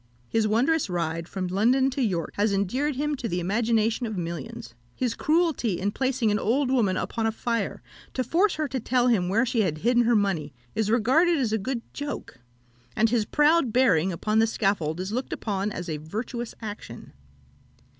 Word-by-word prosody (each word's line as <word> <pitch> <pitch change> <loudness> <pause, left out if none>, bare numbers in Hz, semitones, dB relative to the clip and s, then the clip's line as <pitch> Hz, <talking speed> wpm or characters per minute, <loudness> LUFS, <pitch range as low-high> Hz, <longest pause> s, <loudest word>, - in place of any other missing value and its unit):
His 220 - +1
wondrous 255 +6 +2
ride 165 -1 -2
from 190 -2 -3
London 240 +9 +2
to 270 - -2
York 180 -9 -1
has 205 +1 +1
endeared 255 +10 0
him 295 +3 -1
to 245 - -3
the 180 -4 -1
imagination 225 +5 +1
of 215 -3 -5
millions; 165 -8 -6 0.2
his 250 -3 -1
cruelty 305 - +1
in 200 +2 0
placing 255 -2 0
an 210 - +1
old 260 +4 +1
woman 210 -8 +2
upon 225 -1 -1
a - - +1
fire, 230 +1 -2 0.3
to 255 - 0
force 350 - +2
her 310 -1 -1
to 260 +1 -2
tell 250 +1 +2
him 185 -7 +2
where 225 +6 +3
she 230 -2 +1
had 165 -7 0
hidden 240 +6 +2
her 235 0 +3
money, 175 -9 0 0.2
is 220 -1 0
regarded 265 +10 +3
as 240 -6 0
a 220 - +1
good 235 +3 -3
joke; 285 - -6 0.6
and 225 +1 +3
his 230 -3 +2
proud 295 -2 +3
bearing 195 -8 +3
upon 215 +5 0
the 225 - +4
scaffold 195 -7 0
is 190 +2 -3
looked 250 +4 -3
upon 205 -1 -2
as 180 -2 -5
a 155 -2 -2
virtuous 225 - -5
action. 210 -1 -8
225 Hz, 190 wpm, -26 LUFS, 195-255 Hz, 0.6 s, the